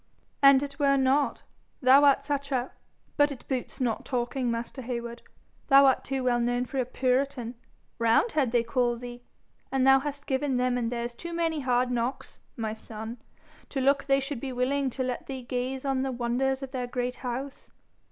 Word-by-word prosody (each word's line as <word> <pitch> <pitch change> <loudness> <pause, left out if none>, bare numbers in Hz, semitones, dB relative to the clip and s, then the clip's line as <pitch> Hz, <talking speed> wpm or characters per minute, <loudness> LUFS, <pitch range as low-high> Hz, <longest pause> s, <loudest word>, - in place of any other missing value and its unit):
'An' 275 -1 +7
it 280 +1 -7
were 275 -1 +4
not 270 +2 +1 0.4
thou 265 +2 +6
art 280 -1 +5
such 280 -1 -3
a! 255 -1 -1 0.5
But 290 -1 +4
it 265 - -9
boots 260 0 -4
not 240 -4 -1
talking, 250 0 -2
master 235 +3 -4
Heywood. 235 -1 -5 0.5
Thou 275 0 +7
art 265 - +3
too 270 -1 -2
well 245 -1 +2
known 245 +1 0
for 270 +2 -4
a 255 - +1
puritan 255 -1 0 0.5
roundhead 235 - +2
they 240 -1 +3
call 240 +1 0
thee; 245 0 -8 0.5
and 265 -1 +2
thou 270 0 +7
hast 285 +1 -5
given 265 -1 0
them 250 0 +1
and 240 -1 -1
theirs 240 0 -3
too 340 +8 -7
many 330 -2 0
hard 250 -2 +1
knocks, 245 +2 -3 0.2
my 220 -2 -2
son, 220 +1 -8 0.5
to 270 - -3
look 275 +1 +2
they 275 0 +3
should 270 -1 -4
be 265 +1 -5
willing 265 +2 0
to 260 +1 -3
let 250 -1 -4
thee 265 -2 -6
gaze 255 +1 -3
on 270 -1 0
the 265 0 -1
wonders 255 +3 -1
of 265 - -6
their 250 -2 -3
great 250 0 -3
house. 265 +2 -6
260 Hz, 190 wpm, -27 LUFS, 245-275 Hz, 0.5 s, An